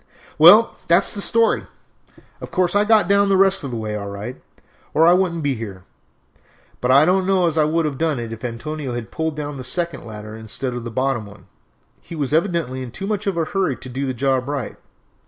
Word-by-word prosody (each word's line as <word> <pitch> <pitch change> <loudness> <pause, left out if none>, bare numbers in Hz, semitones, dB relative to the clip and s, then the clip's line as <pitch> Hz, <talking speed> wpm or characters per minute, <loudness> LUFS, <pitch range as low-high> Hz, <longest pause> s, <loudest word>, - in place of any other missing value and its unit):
"Well, 205 +9 +7
that 170 +3 +4
is - - -2
the 200 - -3
story. 230 +2 +2 0.7
Of - - -7
course 185 0 0
I 205 +1 +3
got 215 -4 +4
down 200 0 +3
the 195 - +3
rest 195 -1 +3
of 140 - -4
the 120 - -4
way 110 -1 -4
all 100 -1 -5
right, 105 +5 -7 0.5
or 160 - +5
I 170 - +7
wouldn't 175 -3 0
be 140 -1 +1
here; 100 -6 -7 1.0
but 125 - -1
I 140 +3 +6
don't 185 +2 +2
know 190 -2 +3
as 165 -2 0
I 155 -2 +3
would 160 +1 0
have 140 -3 -3
done 160 -5 0
it 115 -1 -5
if 115 - -10
Antonio 130 +2 -5
had 120 -2 -6
pulled 160 -1 -2
down 145 -1 -5
the 130 - -7
second 170 +4 -3
ladder 110 -1 -9
instead 110 +4 -5
of 120 -1 -6
the - - -4
bottom 130 -2 -1
one. 100 -3 -15 0.6
He 170 - -10
was 145 -2 -2
evidently 165 -6 0
in 130 - -6
too 190 +11 -6
much 205 0 -3
of 190 -3 -1
a 165 - +1
hurry 185 -6 -1
to 130 +2 -10
do 135 +2 -3
the 130 - -3
job 135 +1 +1
up - - -7
right. 140 -6 -4
145 Hz, 235 wpm, -21 LUFS, 120-175 Hz, 1.0 s, Well